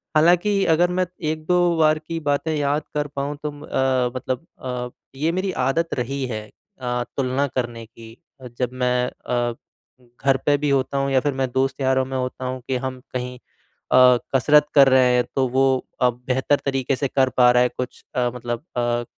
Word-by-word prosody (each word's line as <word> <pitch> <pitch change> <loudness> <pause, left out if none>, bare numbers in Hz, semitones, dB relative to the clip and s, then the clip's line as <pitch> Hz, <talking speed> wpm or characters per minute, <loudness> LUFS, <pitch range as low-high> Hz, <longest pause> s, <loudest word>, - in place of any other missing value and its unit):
हालाँकि 180 +5 +4
अगर 170 +2 +3
मैं 185 +1 +1 0.2
1-2 155 +3 -1 0.2
बार 155 -1 +3
की 165 +1 -5
बातें 150 +1 -1
याद 145 +1 0 0.2
कर 145 0 0
पाऊँ 140 +1 -2
तो 150 - -2
म 145 0 -13
अ, 130 -2 +1
मतलब 130 +3 -3 0.2
अ, 125 -1 -4 0.3
ये 155 +4 0
मेरी 185 +2 -1
आदत 165 +6 0
रही 135 +2 -2
है 110 -3 -5 0.4
अ, 125 -1 -1
तुलना 135 +1 +1
करने 120 -3 -4
की, 115 0 -14 0.4
जब 125 -2 0
मैं 125 -1 +1
अ, 120 -1 -2 0.7
घर 135 -1 +4
पे 145 - +4
भी 145 +1 -1
होता 135 0 +1
हूँ 140 0 0
या 135 - +4
फिर 145 +2 -1
मैं 130 -1 -1
दोस्त-यारों 130 0 +1
में 130 0 -4
होता 130 0 -4
हूँ 130 0 -4
कि 130 - -1
हम 130 -1 -4
कहीं 125 0 -4 0.5
अ, 125 -1 +7 0.2
कसरत 150 +3 +5
कर 140 -2 +8
रहे 130 -1 +5
हैं 125 - +3
तो 130 -1 +2
वो 130 +2 +2 0.3
अ, 125 - +5
बेहतर 125 +3 0
तरीकें 135 0 0
से 140 +2 -1
कर 130 0 +2
पा 125 -1 +7
रहा 125 0 +4
है 125 - +2
कुछ 125 -1 -5
अ, 125 -1 +1
मतलब 120 +1 -4
अ, 120 0 0
130 Hz, 190 wpm, -22 LUFS, 125-145 Hz, 0.7 s, कर